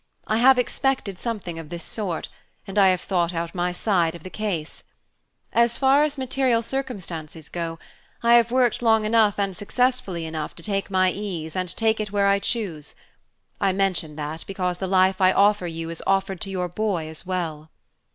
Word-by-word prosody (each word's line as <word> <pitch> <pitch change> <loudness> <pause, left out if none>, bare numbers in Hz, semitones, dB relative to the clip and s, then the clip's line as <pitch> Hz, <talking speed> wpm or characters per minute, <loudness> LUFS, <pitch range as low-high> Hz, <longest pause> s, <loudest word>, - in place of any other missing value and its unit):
I 215 - +1
have 255 +3 +6
expected 250 -6 -1
something 200 -8 -4
of 160 -2 -9
this 170 0 -5
sort, 195 -7 -3 0.4
and 195 +1 -1
I 195 - +7
have 185 -1 +2
thought 175 -2 0
out 165 0 -3
my 180 0 0
side 175 -3 +1
of 170 - -11
the 185 - -8
case. 185 -8 -4 0.7
As 235 0 +3
far 275 +1 +4
as 295 -1 -1
material 260 -3 +1
circumstances 175 - -5
go, 165 -1 -4 0.5
I 235 0 +5
have 235 -1 +6
worked 245 -2 +2
long 220 -2 +3
enough 215 -2 +3
and 195 -2 -1
successfully 205 -5 0
enough 160 -1 -5
to 170 - -11
take 195 0 -2
my 185 -1 +3
ease 180 -6 -5
and 185 -1 -1
take 225 -1 +2
it 210 -2 -3
where 200 -1 +2
I 200 0 +4
choose. 195 -10 -3 0.6
I 195 -1 +2
mention 185 -6 0
that 155 +1 -5
because 180 -2 -2
the 190 - -2
life 190 +1 +3
I 185 0 +6
offer 205 -2 +3
you 165 0 -5
is 165 - -6
offered 195 -1 +1
to 195 - -4
your 180 -2 -2
boy 180 -3 -2
as 160 0 -7
well." 160 -4 -3
195 Hz, 190 wpm, -24 LUFS, 170-220 Hz, 0.7 s, I